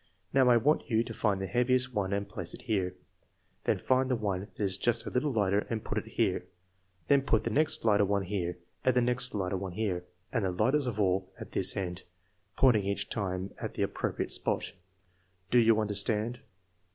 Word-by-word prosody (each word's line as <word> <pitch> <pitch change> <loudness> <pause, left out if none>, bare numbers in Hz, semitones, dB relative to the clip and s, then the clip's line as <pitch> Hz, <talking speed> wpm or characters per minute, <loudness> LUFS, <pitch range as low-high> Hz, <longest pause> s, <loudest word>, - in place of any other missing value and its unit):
Now, 130 -2 +5
I 120 - +7
want 145 +5 +1
you 115 -1 +3
to - - -7
find 100 -3 0
the 95 - -2
heaviest 125 +3 +1
one 100 -3 -1
and 100 0 -1
place 85 -1 -4
it - - -11
here. 95 -6 -1 0.7
Then - - +2
find 130 0 +1
the 130 - +2
one 100 -5 -1 0.2
that - - -22
is 95 -2 +2
just 120 -1 +1
a - - -5
little 135 +4 +1
lighter 105 -3 +1
and 110 -2 -2
put - - -1
it - - -11
here. - - 0 0.6
Then 140 -1 +5
put 115 -5 +1
the 115 - -2
next 155 0 +1
lighter 105 -2 +5
one 100 0 +1
here, 90 -2 -3 0.3
and 130 - +3
the 125 - +4
next 125 0 0
lighter 95 -1 -1
one 95 -1 -5
here, 95 -3 -1 0.3
and 115 -4 +1
the 95 - +1
lightest 130 +10 +1
of 110 -3 -3
all 95 -1 +1
at - - -8
this - - +1
end 90 -2 -3 0.6
(pointing 120 -6 +5
each 100 0 -2
time 95 -2 -3
at - - -5
the - - 0
appropriate - - -2
spot). - - -1 0.8
Do 125 - +6
you 115 -1 +5
understand 105 +3 -1
105 Hz, 205 wpm, -30 LUFS, 95-125 Hz, 0.8 s, I